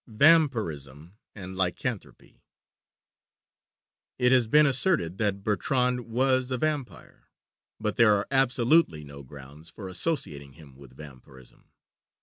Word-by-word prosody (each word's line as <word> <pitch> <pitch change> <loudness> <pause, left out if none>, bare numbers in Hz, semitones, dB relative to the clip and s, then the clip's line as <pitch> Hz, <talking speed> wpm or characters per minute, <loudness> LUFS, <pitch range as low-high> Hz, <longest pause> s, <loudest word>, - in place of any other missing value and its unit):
VAMPIRISM 105 - +1 0.2
AND 95 -2 -9
LYCANTHROPY 95 -2 -5 1.8
It 125 -1 +2
has 125 -3 +3
been 150 +5 +5
asserted 130 - 0
that 100 -2 -2
Bertrand 125 +4 -1
was 130 +2 0
a 130 - -2
vampire; 150 -2 -5 0.5
but 105 -1 -3
there 110 -3 +5
are 100 - -2
absolutely 125 - +2
no 70 -1 -11
grounds 70 +3 -12
for 100 - -10
associating 90 - -4
him 70 -4 -17
with 65 -2 -17
vampirism. 65 -3 -16
105 Hz, 115 wpm, -26 LUFS, -, 1.8 s, been